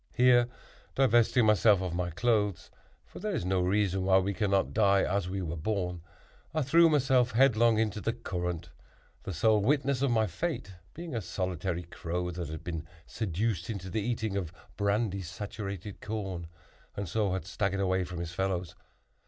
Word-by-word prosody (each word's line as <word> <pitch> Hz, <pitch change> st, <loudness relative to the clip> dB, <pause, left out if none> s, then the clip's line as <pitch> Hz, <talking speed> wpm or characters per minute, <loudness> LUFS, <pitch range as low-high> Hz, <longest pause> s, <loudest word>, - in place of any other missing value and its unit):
Here, 125 Hz, -1 st, +5 dB, 0.5 s
divesting 120 Hz, -2 st, +4 dB
myself 105 Hz, -1 st, +5 dB
of 90 Hz, -2 st, -3 dB
my 90 Hz, 0 st, -1 dB
clothes, 105 Hz, +1 st, 0 dB, 0.3 s
(for -, -, -11 dB
there -, -, -2 dB
is -, -, -2 dB
no 95 Hz, 0 st, +1 dB
reason 95 Hz, 0 st, +1 dB
why 95 Hz, 0 st, +5 dB
we 95 Hz, +1 st, +1 dB
cannot 100 Hz, -1 st, +1 dB
die 100 Hz, -3 st, +4 dB
as 95 Hz, -1 st, -1 dB
we 95 Hz, 0 st, -3 dB
were 85 Hz, -1 st, -3 dB
born), 90 Hz, 0 st, -2 dB, 0.5 s
I 155 Hz, -, +2 dB
threw 165 Hz, +5 st, +6 dB
myself 130 Hz, -4 st, +3 dB
headlong 115 Hz, -2 st, +4 dB
into 105 Hz, -2 st, 0 dB
the 115 Hz, -, 0 dB
current; 90 Hz, -6 st, -4 dB, 0.5 s
the -, -, -5 dB
sole 105 Hz, +5 st, +3 dB
witness 135 Hz, +2 st, +1 dB
of 140 Hz, -, +2 dB
my 110 Hz, -2 st, +3 dB
fate 115 Hz, -, -3 dB, 0.2 s
being 170 Hz, -1 st, -7 dB
a 115 Hz, -, -1 dB
solitary 90 Hz, -1 st, -3 dB
crow 90 Hz, +1 st, -4 dB
that 85 Hz, -1 st, -5 dB
had 80 Hz, -1 st, -7 dB
been 80 Hz, -2 st, -5 dB, 0.2 s
seduced 100 Hz, -2 st, -2 dB
into 95 Hz, -4 st, -5 dB
the 110 Hz, -, -1 dB
eating 110 Hz, -2 st, -2 dB
of 90 Hz, -5 st, -2 dB, 0.2 s
brandy 100 Hz, -1 st, 0 dB
saturated 100 Hz, +1 st, -6 dB
corn, 95 Hz, -6 st, -4 dB, 0.5 s
and 100 Hz, -1 st, -3 dB
so 100 Hz, +2 st, 0 dB
had 95 Hz, -4 st, -3 dB
staggered 95 Hz, +1 st, -1 dB
away 95 Hz, -1 st, +1 dB
from 90 Hz, 0 st, -7 dB
his 85 Hz, -1 st, -5 dB
fellows. 90 Hz, -1 st, -2 dB
100 Hz, 170 wpm, -30 LUFS, 90-110 Hz, 0.5 s, threw